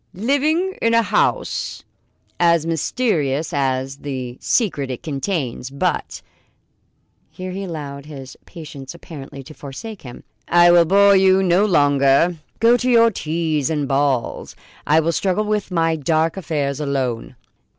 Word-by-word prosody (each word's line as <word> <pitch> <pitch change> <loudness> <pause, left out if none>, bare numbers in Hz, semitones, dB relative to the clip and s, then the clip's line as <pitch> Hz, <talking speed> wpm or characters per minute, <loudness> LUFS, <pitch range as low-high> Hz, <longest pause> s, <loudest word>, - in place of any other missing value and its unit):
"Living 300 - 0
in 230 0 +2
a 230 - +4
house 210 +1 -1 0.6
as 170 -2 +3
mysterious 160 - -1
as 135 -1 -1
the 130 -4 -6
secret 160 - 0
it 125 - -6
contains. 140 -4 -3
But 140 +1 -3 0.5
" - - -45 0.3
here 185 0 -7
he 195 +2 -5
allowed 145 -4 -7
his 135 -3 -10
patience 150 -4 -10
apparently 140 -5 -10
to 155 - -12
forsake 190 +11 -9
him, 125 -2 -11 0.2
"I 175 0 +6
will 175 -1 +6
bore 200 +3 +5
you 190 0 +4
no 185 +3 +3
longer. 145 -1 +3 0.2
Go 235 +2 +5
to 255 +1 -1
your 230 -1 +5
teas 155 -5 -2
and 150 -3 -1
balls; 135 -2 -1 0.3
I 155 +2 +4
will 165 +1 +1
struggle 195 +5 0
with 210 -2 -1
my 165 -2 +1
dark 160 +2 0
affairs 150 -6 -2
alone." 130 -5 -3
160 Hz, 140 wpm, -20 LUFS, 140-190 Hz, 0.6 s, I